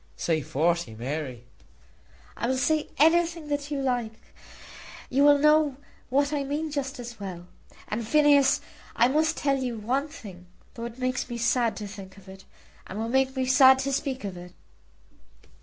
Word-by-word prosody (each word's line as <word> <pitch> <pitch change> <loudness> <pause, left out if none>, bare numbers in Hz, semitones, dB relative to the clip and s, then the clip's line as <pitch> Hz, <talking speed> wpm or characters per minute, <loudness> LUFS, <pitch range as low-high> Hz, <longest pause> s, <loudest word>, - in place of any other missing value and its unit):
"Say 160 -2 0
forty, 160 -4 -1
Mary." 130 0 -5 0.9
"I 235 - -2
will 260 +1 0
say 310 +3 0
anything 330 0 +3
that 290 0 -2
you 290 -2 -2
like; 245 -4 -2 0.9
you 275 +2 +3
will 290 0 +7
know 300 -1 +3 0.3
what 285 +3 +1
I 285 -1 0
mean 295 +3 -3
just 280 -2 -4
as 240 -2 -8
well. 180 -3 -7 0.4
And, 215 +1 -4
Phineas, 290 -1 +4 0.3
I 240 - +4
must 315 +3 +1
tell 275 -1 +1
you 245 -3 -3
one 255 +7 -1
thing, 190 - -12 0.3
though 235 - -6
it 235 0 -8
makes 255 0 -2
me 240 - -4
sad 235 0 +1
to 210 - -6
think 195 -1 -11
of 195 -1 -17
it, 190 0 -12 0.4
and 190 - -7
will 225 +1 -3
make 265 +1 +1
me 260 -1 0
sad 260 +1 +7
to 275 - -1
speak 270 -2 -2
of 195 -2 -5
it." 175 0 -11
255 Hz, 175 wpm, -26 LUFS, 205-285 Hz, 0.9 s, will